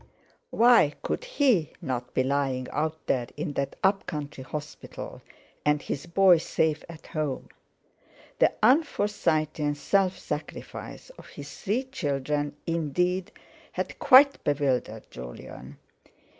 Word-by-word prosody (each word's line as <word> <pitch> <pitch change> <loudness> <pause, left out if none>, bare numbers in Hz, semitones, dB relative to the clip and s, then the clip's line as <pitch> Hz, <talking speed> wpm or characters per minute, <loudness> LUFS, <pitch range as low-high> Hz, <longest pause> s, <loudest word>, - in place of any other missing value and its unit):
Why 230 -10 +5
could - - -2
he 260 - +2
not 125 -1 -4
be 130 - +3
lying 135 -1 0
out 160 +1 -2
there 125 -3 0
in 150 0 -3
that 140 -1 -2
up 195 0 +2
country 145 -4 -5
hospital, 150 +2 -7 0.4
and 150 0 +3
his 140 +2 -5
boy 180 0 +5
safe 160 -1 0
at 165 -2 -11
home? 150 -4 -3 0.9
The - - +5
un 260 +8 +7
Forsytean 155 - 0
self 190 +5 +1
sacrifice - - -7
of - - -13
his - - -10
three 225 +6 0
children, 145 - -2
indeed, 175 +3 0 0.4
had - - -4
quite 275 +2 +7
bewildered 140 -3 0
Jolyon. 65 +2 -9
155 Hz, 120 wpm, -27 LUFS, 140-190 Hz, 0.9 s, un